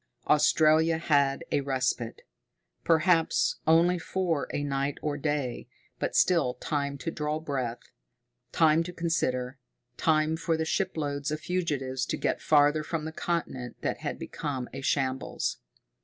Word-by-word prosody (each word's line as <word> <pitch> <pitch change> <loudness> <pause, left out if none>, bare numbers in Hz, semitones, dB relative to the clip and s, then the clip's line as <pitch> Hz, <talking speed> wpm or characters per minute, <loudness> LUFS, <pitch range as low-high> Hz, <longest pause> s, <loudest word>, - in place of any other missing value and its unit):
Australia 155 +1 +4
had 145 -2 +2
a 145 - +2
respite. 130 -3 -2 0.6
Perhaps 165 0 +3
only 170 +2 +4
for 170 -4 -1
a 145 - -2
night 140 0 -1
or 150 -1 -1
day, 145 -4 -2 0.3
but - - -2
still 165 -9 +3
time 140 +2 -2
to 165 - -4
draw 150 0 -2
breath, 130 -6 -3 0.7
time 160 0 +4
to 175 +2 -4
consider, 135 -7 -1 0.4
time 155 0 +2
for 165 0 -1
the 160 - -1
shiploads 150 -6 -1
of 155 0 -2
fugitives 145 -8 -2
to - - -2
get - - -1
farther 150 0 +4
from 155 0 -3
the 160 - -4
continent 160 -7 -3
that - - -2
had - - -4
become 135 -5 -4
a 135 - -6
shambles. 130 -1 -1
150 Hz, 140 wpm, -28 LUFS, 135-165 Hz, 0.7 s, Australia